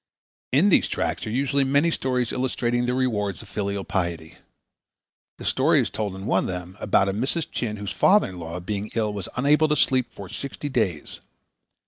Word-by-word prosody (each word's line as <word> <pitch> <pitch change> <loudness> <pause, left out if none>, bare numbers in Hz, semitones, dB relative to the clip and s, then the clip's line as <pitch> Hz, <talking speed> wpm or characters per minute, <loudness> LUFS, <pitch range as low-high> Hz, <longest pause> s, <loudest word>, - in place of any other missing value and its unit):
In 155 +10 +4
these - - +4
tracts - - -2
are - - -2
usually 140 +4 +1
many 140 +5 +3
stories 125 -5 -1
illustrating 120 -1 0
the 125 - +1
rewards 105 -7 -1
of 105 - -15
filial 100 -1 -2
piety. 85 -3 -3 1.0
The - - -9
story - - +3
is - - 0
told 105 -3 -3
in 95 +1 -7
one 95 - +2
of - - -2
them 90 0 -5
about 100 -1 +2
a 95 - 0
Mrs. 135 - 0
Chin 105 -3 -3
whose 100 0 -5
father 205 - +4
in 90 -1 -9
law 85 +1 -5
being 100 +3 -4
ill 110 -2 0
was 100 -3 -5
unable 150 +4 +4
to 150 - +2
sleep 130 -3 +2
for 100 - -9
sixty 140 +8 -5
days. 105 - -1
110 Hz, 190 wpm, -24 LUFS, 95-130 Hz, 1.0 s, In